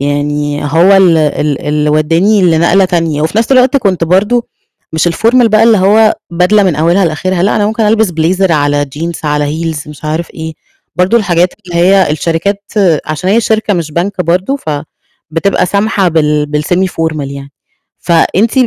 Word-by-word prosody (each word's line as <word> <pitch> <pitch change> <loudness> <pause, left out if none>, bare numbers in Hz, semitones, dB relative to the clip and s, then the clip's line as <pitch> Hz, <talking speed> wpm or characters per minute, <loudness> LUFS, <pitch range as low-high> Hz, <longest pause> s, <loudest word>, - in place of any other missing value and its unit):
يعني 145 +1 -2
هو 170 +7 +3
ال 180 -4 +4
ال 150 -1 -1
اللي 150 0 0
ودّاني 165 +7 +2
لنقلة 170 +3 +3
تانية، 165 -4 -1
وفي 160 +8 -1
نفْس 230 +4 0
الوقت 255 +2 +3
كنت 195 -9 0
برضه 205 +8 +1 0.5
مش 160 +2 +1
الformal 230 +7 +2
بقى 215 +1 +3
اللي 225 -3 +4
هو 215 +3 +3 0.2
بدلة 180 +5 +2
من 180 -6 0
أولها 170 +5 +2
لآخرها، 175 +3 -2
لأ، 200 - +1
أنا 205 - +1
ممكن 220 +1 -2
ألبس 220 -1 +2
blazer 175 +3 0
على 145 -2 +1
jeans 165 0 -5
على 150 0 0 0.2
heels 160 -3 -4
مش 150 0 -12
عارف 160 +2 -3
إيه، 160 0 -6 0.4
برضه 180 +6 +2
الحاجات 180 -3 0
اللي 175 -1 -5
هي 185 0 +3
الشركات 170 +6 -2 0.4
عشان 155 +4 -2
هي 225 +3 +3
شركة 220 -2 0
مش 165 -3 -3
بنك 185 +3 -2
برضه 185 - 0
فبتبقى 160 - -4
سامحة 200 0 0
بال 150 -2 0
بال-semi 150 +6 -1
formal 160 -3 -3
يعني. 140 0 -9 0.5
فأنتِ 185 +6 +1
170 Hz, 165 wpm, -11 LUFS, 155-200 Hz, 0.5 s, ال